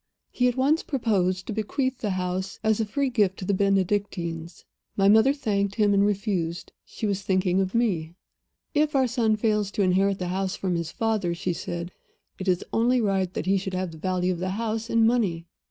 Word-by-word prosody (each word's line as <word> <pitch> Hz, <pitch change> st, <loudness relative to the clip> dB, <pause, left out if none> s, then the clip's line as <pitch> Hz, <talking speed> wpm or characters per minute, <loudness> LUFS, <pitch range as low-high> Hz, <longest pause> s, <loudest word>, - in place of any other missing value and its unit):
"He 250 Hz, -, +2 dB
at 245 Hz, +1 st, -1 dB
once 285 Hz, +5 st, +3 dB
proposed 190 Hz, -, 0 dB
to -, -, -4 dB
bequeath 255 Hz, +5 st, -2 dB
the 210 Hz, -, -2 dB
house 185 Hz, +1 st, -2 dB
as 220 Hz, 0 st, +2 dB
a 220 Hz, -, +1 dB
free 275 Hz, +4 st, -1 dB
gift 205 Hz, -6 st, +2 dB
to 185 Hz, -, -6 dB
the 200 Hz, -, +1 dB
Benedictines. 190 Hz, -4 st, -1 dB, 0.3 s
My 195 Hz, -1 st, +4 dB
mother 220 Hz, +6 st, +6 dB
thanked 200 Hz, -8 st, -1 dB
him 210 Hz, -2 st, +3 dB
and 200 Hz, 0 st, +4 dB
refused. 190 Hz, -5 st, -1 dB
She -, -, -6 dB
was 200 Hz, -1 st, -1 dB
thinking 185 Hz, -1 st, +1 dB
of 190 Hz, +3 st, -2 dB
me. 175 Hz, -9 st, 0 dB, 0.6 s
'If 300 Hz, -1 st, +1 dB
our 265 Hz, -1 st, +4 dB
son 230 Hz, -3 st, +1 dB
fails 210 Hz, -2 st, 0 dB
to 205 Hz, -, +1 dB
inherit 190 Hz, +1 st, +2 dB
the 180 Hz, -2 st, -3 dB
house 190 Hz, +1 st, -1 dB
from 185 Hz, -2 st, -2 dB
his 170 Hz, -1 st, -2 dB
father,' 215 Hz, -6 st, -1 dB
she 175 Hz, +1 st, -2 dB
said, 170 Hz, 0 st, -5 dB, 0.5 s
'it 190 Hz, -, -5 dB
is 180 Hz, -1 st, +1 dB
only 245 Hz, +3 st, +3 dB
right 195 Hz, -4 st, 0 dB
that -, -, -2 dB
he 195 Hz, +1 st, +3 dB
should 190 Hz, 0 st, -4 dB
have 185 Hz, -2 st, -2 dB
the 160 Hz, -, -11 dB
value 185 Hz, +1 st, 0 dB
of 170 Hz, -, -6 dB
the 185 Hz, +1 st, -2 dB
house 225 Hz, 0 st, -2 dB
in 230 Hz, -1 st, +4 dB
money. 205 Hz, -9 st, +1 dB
200 Hz, 205 wpm, -25 LUFS, 185-225 Hz, 0.6 s, mother